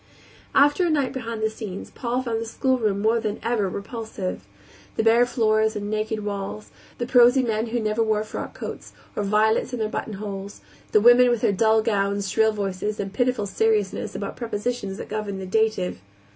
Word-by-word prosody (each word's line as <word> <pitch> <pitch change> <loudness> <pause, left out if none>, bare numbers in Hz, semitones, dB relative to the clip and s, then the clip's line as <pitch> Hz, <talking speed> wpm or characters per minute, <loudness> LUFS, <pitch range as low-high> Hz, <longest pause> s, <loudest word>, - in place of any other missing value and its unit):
After 290 +6 +5
a 350 - +2
night 285 -5 +1
behind 230 -4 -4
the 220 - +2
scenes 205 -4 -7
Paul 245 +1 -2
found 225 -2 -2
the 230 - -4
schoolroom 225 -5 0
more 225 +2 +3
than 215 -2 -3
ever 225 -4 0
repulsive; 200 - -5 0.5
the - - +1
bare 230 +2 +5
floors 220 -2 +2
and 205 0 -4
naked 215 0 -2
walls; 200 +1 -5 0.3
the 240 - -2
prosy 250 +1 +5
men 225 -1 -1
who 240 +2 -1
never 215 0 0
wore 215 -1 +1
frock 215 - -6
coats, - - -7 0.2
or - - -1
violets 215 +4 +2
in - - -1
their 215 -1 -1
buttonholes; 200 -2 -5 0.3
the 215 - +5
women 245 +2 +7
with 240 -2 +1
their - - +3
dull 220 +2 +3
gowns, 200 -2 0
shrill 220 0 +3
voices, 205 0 -3
and 195 -1 -4
pitiful 245 -2 +1
seriousness 210 0 0
about 200 - -4
prepositions 225 -3 -3
that - - -7
govern 210 -2 -4
the 190 - -5
dative. 215 - 0
220 Hz, 185 wpm, -24 LUFS, 205-235 Hz, 0.5 s, women